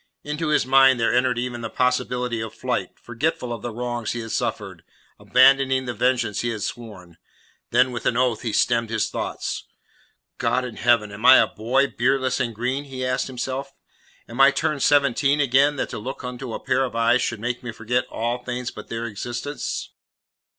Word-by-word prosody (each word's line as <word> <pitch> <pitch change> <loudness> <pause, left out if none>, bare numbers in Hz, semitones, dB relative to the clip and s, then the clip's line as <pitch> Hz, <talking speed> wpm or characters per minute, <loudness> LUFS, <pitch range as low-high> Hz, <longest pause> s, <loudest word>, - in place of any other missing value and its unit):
Into 150 +2 -3
his 150 - +2
mind 135 -1 +5
there 115 - +2
entered 125 0 +2
even 120 0 -3
the 115 - -4
possibility 125 -2 0
of 110 -1 -6
flight, - - -2
forgetful 120 -1 -2
of 115 - -7
the 120 - -4
wrongs 120 0 -3
he 120 - -4
had 115 -1 -7
suffered, - - -3 0.4
abandoning 130 0 +4
the 120 - -3
vengeance 120 -2 0
he 120 - -1
had 110 -3 -4
sworn. 95 -8 -8 0.5
Then 125 +2 +3
with 120 - -3
an 120 - +1
oath 125 -3 +1
he 115 - -2
stemmed 115 +1 +1
his 110 -2 -1
thoughts. - - -4 0.7
"God 130 0 +1
in 120 - -8
heaven, 120 -4 +2
am 100 +2 -9
I 130 - +10
a - - +5
boy, 125 +6 +1
beardless 130 -1 0
and 120 -3 -2
green?" 130 +5 -2
he 130 -2 -5
asked 130 0 -1
himself. 130 +2 -4 0.5
"Am 120 +4 -2
I 135 - +9
turned 140 +1 -1
seventeen 140 0 +3
again, 140 +1 +3
that - - -3
to - - -5
look 130 +6 -6
into 125 -1 -5
a - - -5
pair 135 - +1
of 125 -3 -4
eyes 115 +2 +3
should 115 - -2
make 120 +2 -3
me 120 - -6
forget 115 +2 -1
all 120 +2 -2
things 125 0 -4
but - - -10
their 115 0 -4
existence?" 120 +6 -5
125 Hz, 190 wpm, -23 LUFS, 115-130 Hz, 0.7 s, I